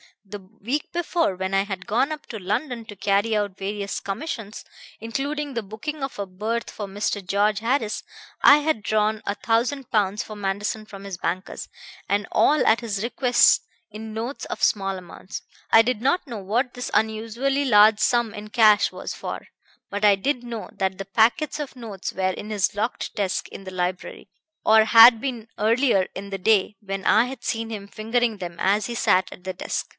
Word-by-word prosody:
The 205 +1 -8
week 220 +9 -5
before, 340 - 0
when 190 +1 -3
I 195 0 +3
had 195 -2 -6
gone 245 +8 +1
up 305 0 -6
to 220 - -6
London 230 +5 -3
to 205 - -10
carry 200 +3 +1
out 205 -2 -1
various 200 0 -3
commissions, 215 -1 -5 0.4
including 280 +6 -3
the 230 -2 -2
booking 270 +9 -6
of 270 - -4
a 200 - -3
berth 215 +5 -3
for 205 - -6
Mr. 205 0 -3
George 205 +2 +1
Harris, 230 -1 0 0.4
I 285 - +8
had 300 -6 0
drawn 215 +1 +1
a 200 - -1
thousand 240 +5 -1
pounds 210 +2 +1
for 215 - -9
Manderson 205 +2 -3
from 195 -2 -11
his 195 -3 -6
bankers; 185 +1 -4 0.4
and 200 0 0
all, 300 - +3
at 220 - +4
his 215 -4 -3
request, 245 +1 +4 0.3
in 215 +1 -8
notes 235 +5 -4
of - - -6
small 195 -2 +1
amounts. 185 +1 -9 0.3
I 225 - +8
did 225 -1 -1
not 275 +8 +1
know 235 -6 -6
what 235 +7 -1
this 245 - -4
unusually 230 +6 0
large 210 -3 +6
sum 240 -3 +2
in 210 +1 -8
cash 215 -4 +5
was - - -6
for; - - -6 0.4
but 205 +1 -1
I 205 -1 +7
did 250 +5 -1
know 235 -2 -6
that 190 -1 -2
the 195 - -5
packets 235 - +2
of 290 -3 -5
notes 220 -6 -6
were 185 0 0
in 210 +3 -7
his 205 -3 +1
locked 215 +4 -3
desk 200 -3 -1
in 195 - -10
the 185 - -7
library, 180 0 -4 0.4
or 220 0 +6
had 230 +1 +9
been 240 -4 -4
earlier 225 -2 +3
in 200 - -6
the 195 - -3
day, 205 +1 +2
when 195 -2 -5
I 220 +3 +5
had 250 -1 -8
seen 225 0 -2
him 205 -3 -6
fingering 225 +2 -1
them 175 -3 -7
as 200 +2 +2
he 235 - -4
sat 190 -5 +2
at 180 - -12
the 185 0 -4
desk. 180 - -4
215 Hz, 190 wpm, -24 LUFS, 200-240 Hz, 0.4 s, had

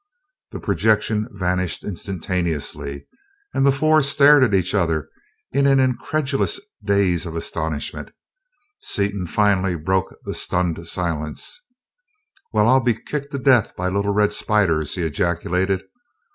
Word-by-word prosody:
The - - -7
projection 105 +2 +1
vanished 90 -4 -2
instantaneously, 85 -7 -4 0.5
and - - +1
the 140 - +5
four 155 +3 +3
stared 140 0 +5
at 105 -6 +3
each 95 0 +1
other 80 -7 0 0.4
in 140 +1 +2
an 135 -1 +4
incredulous 135 +2 0 0.2
daze 100 -4 +1
of 80 - -6
astonishment. 80 -2 -4 0.7
Seaton 100 -2 -1
finally 95 -1 +2
broke 95 +3 -1
the - - -4
stunned 85 -2 -2
silence. 85 - -4 0.9
"Well, 105 0 +3
I'll 130 +1 +5
be 120 -2 +2
kicked 140 +5 -5
to - - -1
death 130 -5 +3
by 90 0 -1
little 100 +2 0
red 105 0 +2
spiders!" 90 -10 +1
he 90 - -2
ejaculated. 90 +4 0
100 Hz, 130 wpm, -21 LUFS, 85-120 Hz, 0.9 s, the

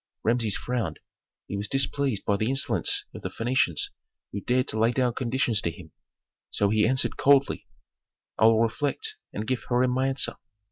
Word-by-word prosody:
Rameses 115 -3 +1
frowned. 125 -4 -3 0.5
He - - -5
was 100 +1 -3
displeased 135 -2 0
by 100 - +2
the 110 +3 -1
insolence 135 +1 +1
of - - -9
the - - -4
Phœnicians 115 - 0 0.4
who 100 - -4
dared 125 +3 +1
to 110 - -1
lay 115 +2 +4
down 125 -1 +1
conditions 125 -3 0
to - - -1
him; 80 -1 -11 0.6
so 100 0 +1
he 110 0 +3
answered 130 +2 +2
coldly, 140 0 +3 0.7
"I - - +3
will 115 0 +5
reflect 145 - -2
and 105 - -4
give 130 +1 -2
Hiram 125 +1 +2
my 130 +1 +1
answer. 135 0 +1
120 Hz, 175 wpm, -26 LUFS, 110-130 Hz, 0.7 s, will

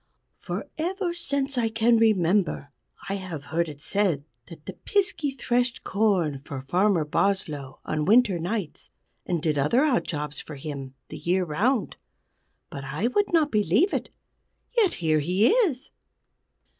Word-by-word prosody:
For - - -4
ever 360 +2 -1
since 280 -5 -2
I 225 -1 +1
can 230 +1 +3
remember 195 -8 +2 0.4
I 195 - -1
have 175 -6 -6
heard 170 0 +1
it 145 -1 -10
said 180 -7 0 0.2
that 160 -3 -13
the 190 - -6
Piskey 330 - 0
threshed 245 -2 -1
corn 185 -9 +1
for 135 -1 -7
Farmer 180 +2 +2
Boslow 150 -5 -1
on 155 -1 -1
winter 215 -3 +4
nights, 180 -1 -4 0.4
and 170 -4 -1
did 150 -3 +1
other 155 - +3
odd 270 -6 +2
jobs 150 -2 -4
for 150 - -8
him 135 -2 -7
the - - -7
year 180 +2 +1
round. 210 - 0 0.7
But 140 - -6
I 150 - -1
would 405 +10 +1
not 315 -3 +3
believe 210 - +2
it. - - -2 0.7
Yet 430 -7 +3
here 155 -2 +1
he 180 +8 +3
is!" 390 - +1
195 Hz, 150 wpm, -26 LUFS, 155-245 Hz, 0.7 s, winter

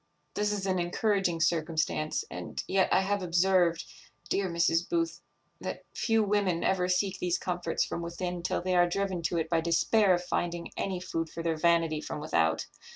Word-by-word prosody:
This 210 0 0
is 200 -2 -2
an 185 -1 +1
encouraging 180 -1 0
circumstance; 155 - 0
and - - -5
yet 190 0 +2
I - - +5
have 200 +1 0
observed, 175 -1 +2 0.4
dear 195 -2 0
Mrs. 170 0 +1
Booth, 335 -1 -1 0.4
that - - -5
few 225 -2 +2
women 200 -4 +1
ever 180 -1 +1
seek 190 +1 0
these 180 0 0
comforts 175 -2 -1
from - - -4
within 175 +1 -4
till 175 - -1
they 185 0 0
are 175 0 +4
driven 190 -1 -1
to 170 +1 -1
it 160 -1 0
by 165 0 +1
despair 185 +4 +3
of 175 - -4
finding 175 -1 -2
any 190 -2 -2
food 165 -3 -3
for 165 - -6
their 165 -1 0
vanity 165 -1 +2
from - - -5
without. 80 - +1
175 Hz, 180 wpm, -29 LUFS, 170-190 Hz, 0.4 s, I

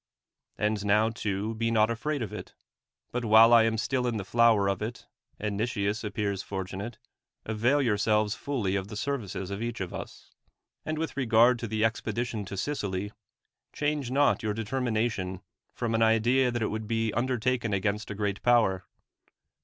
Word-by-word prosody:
And 105 -1 0
now 105 +2 +3
too 105 -1 -2
be 115 +1 -1
not 110 0 +3
afraid 135 +3 -2
of 105 - -6
it; - - -8 0.6
but 125 0 -2
while 115 +1 +7
I 115 -1 +7
am 110 0 0
still 125 +2 0
in 120 -2 -1
the 100 - -4
flower 115 -2 +4
of 100 0 -1
it, 110 +3 -5 0.3
and 105 -1 -3
Xieias 110 -1 -1
appears 100 -2 -2
fortunate, 100 +3 -5 0.5
avail 120 +7 +2
your 110 -5 +2
S(^lves 105 0 +2
fully 120 -9 -2
of 95 -1 -2
the 105 -1 -7
services 105 -8 -3
of 100 +2 -4
each 120 0 -3
of 95 -2 -4
us. - - -9 0.6
And 155 0 -2
with 160 +1 -3
regard 120 -1 +4
to 115 - -4
the 110 +1 +1
expedition 115 -1 -2
to 100 +1 -7
Sicily, 100 -6 -2 0.6
change 145 -3 -1
not 140 +3 +3
your 105 -2 -2
determination 110 -5 -2 0.3
from 120 -2 -3
an 115 - +1
idea 120 +4 +3
that 120 -1 -2
it - - -1
would 110 0 -4
be 115 -1 0
undertaken 125 -1 0
against 100 +2 -1
a 105 - -4
great 100 -1 -2
power. 110 -7 +3
110 Hz, 175 wpm, -28 LUFS, 105-120 Hz, 0.6 s, while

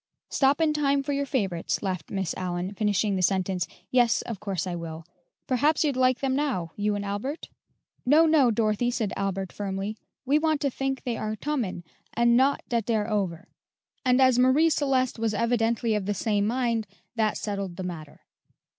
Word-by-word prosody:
"Stop 275 +2 +2
in 315 -2 +3
time 280 -2 +1
for 285 +1 -2
your 280 0 -1
favorites," 195 -12 -1
laughed 185 -5 -3
Miss 190 -4 -2
Allyn, 180 +1 -3
finishing 205 0 +1
the 185 - -1
sentence. 185 -1 +1 0.2
"Yes, 240 -3 +3
of 230 -5 -6
course 195 -2 -3
I 180 - -3
will. 165 -1 -6 0.4
Perhaps 290 +6 +2
you'd 290 -4 +1
like 255 0 +2
them 265 -1 +1
now, 255 - -1
you 205 0 0
and 205 0 -3
Albert?" 210 +10 -4 0.5
"No, 300 +6 +5
no, 310 -6 +5
Dorothy," 220 +1 +1
said 225 -4 -2
Albert 195 -1 -2
firmly; 195 +1 -3 0.3
"we 285 +3 +3
want 315 -1 +1
to 280 - +1
think 270 +1 -3
they 240 -3 -2
are 215 0 -3
tomin', 220 -7 -3 0.3
and 235 0 +4
not 265 +3 +3
dat 230 -3 -1
dey're 220 -3 +1
over." 185 -6 -2 0.6
And 250 0 +3
as 260 -2 +5
Marie 275 +6 +4
Celeste 260 -5 +1
was 220 -2 0
evidently 230 0 +1
of 205 -2 -1
the 205 - 0
same 205 0 0
mind, 230 -2 0 0.3
that 220 -2 +1
settled 200 -4 -4
the 185 - -5
matter. 160 -5 -7
225 Hz, 180 wpm, -26 LUFS, 195-260 Hz, 0.6 s, No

